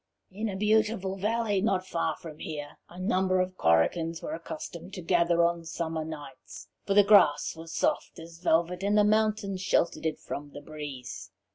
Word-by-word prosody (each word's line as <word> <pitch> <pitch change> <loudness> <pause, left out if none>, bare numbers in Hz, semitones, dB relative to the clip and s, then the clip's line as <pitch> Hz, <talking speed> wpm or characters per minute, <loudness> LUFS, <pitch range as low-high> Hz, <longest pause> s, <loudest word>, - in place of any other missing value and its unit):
"In 215 +3 -3
a 195 - -4
beautiful 210 -1 +1
valley 210 0 0
not 190 -3 +1
far 165 -3 -1
from 155 -2 -10
here 145 -2 -7
a 175 - -11
number 185 -1 +1
of 185 0 -1
Korrigans 160 - +2
were 305 - -5
accustomed 200 - -7
to 180 - -7
gather 170 -1 +3
on 170 0 0
summer 165 -1 -3
nights, 150 -4 -9 0.2
for 195 - +1
the 205 - +8
grass 195 -9 +5
was 165 0 -9
soft - - 0
as 165 0 -11
velvet, 175 +1 +1
and 205 +2 +2
the 210 - +6
mountains 210 -2 +1
sheltered 170 -3 +1
it 155 - -2
from 145 0 -7
the 145 - -8
breeze. 135 -10 -7
175 Hz, 175 wpm, -28 LUFS, 160-200 Hz, 0.2 s, the